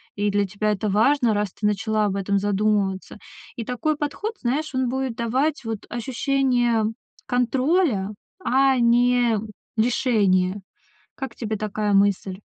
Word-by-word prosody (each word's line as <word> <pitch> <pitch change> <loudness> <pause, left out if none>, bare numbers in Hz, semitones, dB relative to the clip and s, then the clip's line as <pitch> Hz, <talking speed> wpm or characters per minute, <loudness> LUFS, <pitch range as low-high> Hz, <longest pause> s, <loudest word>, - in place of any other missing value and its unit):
и 205 0 0
для 205 0 +2
тебя 210 +2 -1
это 210 +1 -1
важно, 235 +4 +3
раз 205 -2 -1
ты 210 - -1
начала 215 +1 0
об 195 - -1
этом 200 0 0
задумываться. 205 -1 0 0.4
И 230 - -4
такой 270 +5 -1
подход, 300 +10 -3
знаешь, 285 +5 -1
он 260 -1 +1
будет 260 -1 -2
давать 260 +7 0
вот 225 -2 -3
ощущение 245 -2 +1 0.4
контроля, 250 - +1 0.3
а 265 +1 +3
не 240 -1 +3 0.4
лишения. 205 -5 +2 0.6
Как 265 -3 -5
тебе 220 -2 -3
такая 210 0 -1
мысль? 195 -1 +2
225 Hz, 135 wpm, -23 LUFS, 205-255 Hz, 0.6 s, важно